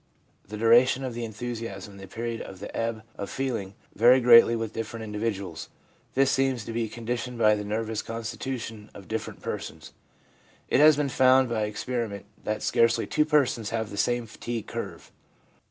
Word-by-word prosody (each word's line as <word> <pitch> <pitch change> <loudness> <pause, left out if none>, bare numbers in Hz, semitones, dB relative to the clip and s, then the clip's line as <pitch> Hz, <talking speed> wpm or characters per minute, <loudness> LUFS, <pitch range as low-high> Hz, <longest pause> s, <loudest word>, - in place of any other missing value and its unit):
The 105 +2 -7
duration 120 +4 +5
of 130 -2 -3
the 120 0 -4
enthusiasm 115 -3 -6
and 100 - -13
the 95 - -9
period 115 +1 -4
of 95 - -9
the 100 - -8
ebb 115 -1 -2 0.2
of 100 - -4
feeling 115 -8 -3 0.2
vary 120 +4 +6
greatly 115 -1 +7
with 115 -1 -3
different 115 0 -5
individuals. 105 -5 -4 0.5
This 135 0 +4
seems 130 -4 +1
to 115 - -5
be 115 -1 -1
conditioned 120 +2 -4
by 110 -2 +5
the 105 0 -2
nervous 110 +1 -2
constitu 115 +3 -4
tion 110 -2 -8
of 100 - -11
different 110 0 -5
persons. - - -6 0.8
It - - +3
has 150 0 +7
been 145 -2 0
found 130 0 +4
by 110 -2 -1
experi 115 +2 -3
ment 100 0 -8 0.2
that 105 0 -2
scarcely 115 0 +3
two 150 - +1
persons 135 -8 +2
have 110 -2 -3
the - - -6
same 120 +3 0
fatigue 115 +1 -5
curve. - - -7
115 Hz, 180 wpm, -27 LUFS, 105-125 Hz, 0.8 s, greatly